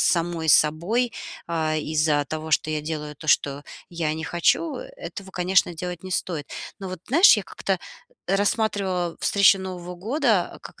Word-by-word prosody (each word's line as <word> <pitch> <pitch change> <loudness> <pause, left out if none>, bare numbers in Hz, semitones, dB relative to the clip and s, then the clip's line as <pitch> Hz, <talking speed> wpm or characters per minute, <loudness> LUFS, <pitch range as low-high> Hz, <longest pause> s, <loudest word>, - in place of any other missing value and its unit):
самой 170 -2 +1
собой, 175 - +3 0.4
э, 160 -2 0
из-за 150 -1 +1
того, 155 +2 -5
что 155 - +2
я 155 -1 -1
делаю 150 -1 -5
то, 155 - -11
что 145 -1 +2 0.3
я 165 -3 -2
не 160 - -5
хочу, 175 - +1
э, - - -8
этого, 195 - -8
конечно, 180 -1 +2
делать 180 +1 -6
не 185 - -7
стоит. 160 -6 -2 0.3
Но 195 -2 -6
вот, 185 -2 -7
знаешь, 320 - +7
я 210 - -2
как-то 190 +1 -2 0.5
рассматривала 195 -3 0
встречу 200 -1 +5
Нового 180 -1 -6
года 225 - 0
как - - -12
175 Hz, 160 wpm, -24 LUFS, 155-195 Hz, 0.5 s, знаешь